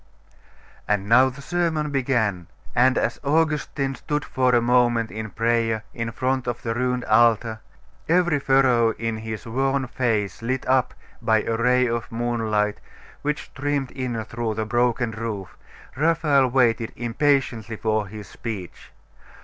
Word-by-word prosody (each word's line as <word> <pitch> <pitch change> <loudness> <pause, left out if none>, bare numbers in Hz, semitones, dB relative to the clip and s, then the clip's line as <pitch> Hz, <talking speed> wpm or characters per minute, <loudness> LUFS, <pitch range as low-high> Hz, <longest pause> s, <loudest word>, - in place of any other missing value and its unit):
And 105 -1 0
now 125 +4 +6
the 140 +2 -11
sermon 160 -3 -1
began; 120 -10 0 0.3
and 130 +2 +4
as - - 0
Augustine 150 -2 0
stood 150 +2 -3
for 130 -1 +2
a - - +5
moment 120 -1 +2
in 110 0 -5
prayer 115 -1 0
in 115 -1 -3
front 130 +1 -1
of 120 -1 -3
the 115 - -1
ruined 125 +1 -1
altar, 115 -1 +3 0.5
every 175 -3 +3
furrow 130 -4 +3
in 115 0 -3
his 110 -1 -6
worn 135 +3 0
face 110 -6 -1
lit 130 +2 -2
up 130 -1 +2 0.3
by 110 -1 +2
a 115 - -1
ray 125 +2 +3
of 115 -1 -3
moonlight 115 -3 -1 0.4
which 150 0 -2
streamed 140 -1 -2
in 125 -4 -3
through 115 0 -3
the 110 0 -2
broken 120 0 +1
roof, 110 -4 -5 0.4
Raphael 150 -2 +3
waited 120 -3 +2
impatiently 120 -2 0
for 110 -1 -1
his 105 -1 -9
speech. 105 -6 -7
120 Hz, 140 wpm, -23 LUFS, 110-135 Hz, 0.5 s, now